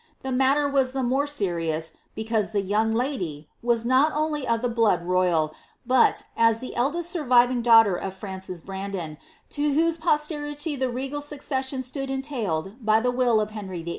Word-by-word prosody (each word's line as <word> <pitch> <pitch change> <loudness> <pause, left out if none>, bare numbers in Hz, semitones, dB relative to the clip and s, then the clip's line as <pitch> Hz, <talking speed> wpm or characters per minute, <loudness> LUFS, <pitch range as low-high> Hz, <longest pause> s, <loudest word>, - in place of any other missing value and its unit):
The 265 - -3
mailer 270 +3 +3
was 270 -2 +1
the 265 -1 -1
more 265 +4 +1
serious, 165 - -2 0.2
because 220 -1 -1
the 200 - +1
young 210 +3 +1
lady, 195 - -2
was 235 -1 +1
not 260 +5 +4
only 300 -3 -1
of 230 -1 +1
ibe 245 -1 0
blood 210 -7 +2
royal, 175 -4 +1 0.3
but, 255 +1 +3
as 230 -1 +4
the 255 +2 -7
eldest 330 +7 0
surviving 250 -6 +3
daughter 225 -5 +6
of 190 +1 -5
Frances 190 -3 -7
Brandos, 190 -5 -5 0.3
to 290 0 0
whose 330 +1 +2
posterity 300 -1 -1
the 260 -1 -1
regal 270 +4 -4
succession 270 -2 -3
stood 270 +2 -5
entailed 235 - -3
by 215 0 +4
the 250 +2 0
will 245 -3 +2
of 215 0 -2
Henry 190 -5 -6
VUI. 170 - -6
240 Hz, 170 wpm, -25 LUFS, 195-275 Hz, 0.3 s, daughter